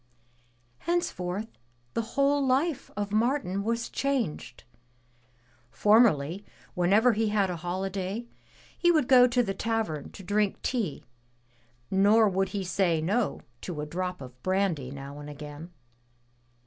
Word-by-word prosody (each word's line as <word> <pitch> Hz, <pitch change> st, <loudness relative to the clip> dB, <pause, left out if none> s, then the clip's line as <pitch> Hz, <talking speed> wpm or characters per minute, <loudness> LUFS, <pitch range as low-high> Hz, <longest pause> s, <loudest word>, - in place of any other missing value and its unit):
Henceforth 215 Hz, -, -2 dB, 0.3 s
the -, -, 0 dB, 0.2 s
whole 280 Hz, +1 st, +3 dB
life 275 Hz, +3 st, +1 dB
of 205 Hz, -1 st, -2 dB
Martin 215 Hz, -3 st, 0 dB
was 230 Hz, +2 st, -1 dB
changed. 265 Hz, -, -2 dB, 1.1 s
Formerly, 200 Hz, -, +3 dB, 0.3 s
whenever 205 Hz, +7 st, +4 dB
he 220 Hz, +1 st, +1 dB
had 200 Hz, -3 st, +1 dB
a 175 Hz, -, -4 dB
holiday, 190 Hz, +5 st, -3 dB, 0.5 s
he 345 Hz, -, +3 dB
would 310 Hz, -7 st, +2 dB
go 250 Hz, -1 st, +7 dB
to 245 Hz, 0 st, +2 dB
the 195 Hz, -, -2 dB
tavern 220 Hz, -10 st, -2 dB
to 195 Hz, -, -10 dB
drink 205 Hz, +2 st, 0 dB
tea 220 Hz, -, -2 dB, 0.9 s
nor 205 Hz, +3 st, +5 dB
would 195 Hz, 0 st, 0 dB
he 200 Hz, -2 st, -3 dB
say 180 Hz, -3 st, +1 dB
no 205 Hz, +8 st, 0 dB, 0.2 s
to 170 Hz, -5 st, -5 dB
a 150 Hz, -, -2 dB
drop 180 Hz, +3 st, -4 dB
of 125 Hz, -1 st, -11 dB
brandy 185 Hz, -8 st, 0 dB
now 140 Hz, +1 st, -8 dB
and 145 Hz, 0 st, -8 dB
again. 150 Hz, +2 st, -9 dB
200 Hz, 130 wpm, -28 LUFS, 175-230 Hz, 1.1 s, go